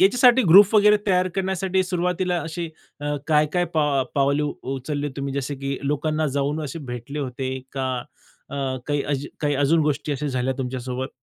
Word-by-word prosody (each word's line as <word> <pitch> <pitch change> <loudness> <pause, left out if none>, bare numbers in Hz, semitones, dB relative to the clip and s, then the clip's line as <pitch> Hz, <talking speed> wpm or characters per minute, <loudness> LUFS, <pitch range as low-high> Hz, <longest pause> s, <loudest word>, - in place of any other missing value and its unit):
याच्यासाठी 245 +6 +6
ग्रुप 200 +5 +8
वगैरे 210 0 +6
तयार 185 -2 +3
करण्यासाठी 190 0 0
सुरुवातीला 180 0 0
अशी 165 +1 -4 0.3
अ, 145 0 -2
काय 150 -1 +4
काय 175 0 +2
पाव 145 -4 +2
पावले 140 +1 +2
उ 150 - -1 0.2
उचलली 145 +2 -3
तुम्ही? 140 -1 -3
जसे 140 +1 -2
की 140 0 -3
लोकांना 155 +1 0
जाऊन 145 +3 0
असे 145 +3 -5
भेटले 125 +5 -6
होते 130 -1 -3 0.2
का? 135 -1 -2 0.6
अ, 140 - -5 0.3
काही 145 -1 0
अज 140 0 -2
काही 145 -1 +1
अजून 160 +4 +4
गोष्टी 150 0 -1
अशा 145 +1 -3
झाल्या 130 0 -1
तुमच्यासोबत? 130 0 -3
150 Hz, 170 wpm, -23 LUFS, 140-180 Hz, 0.6 s, ग्रुप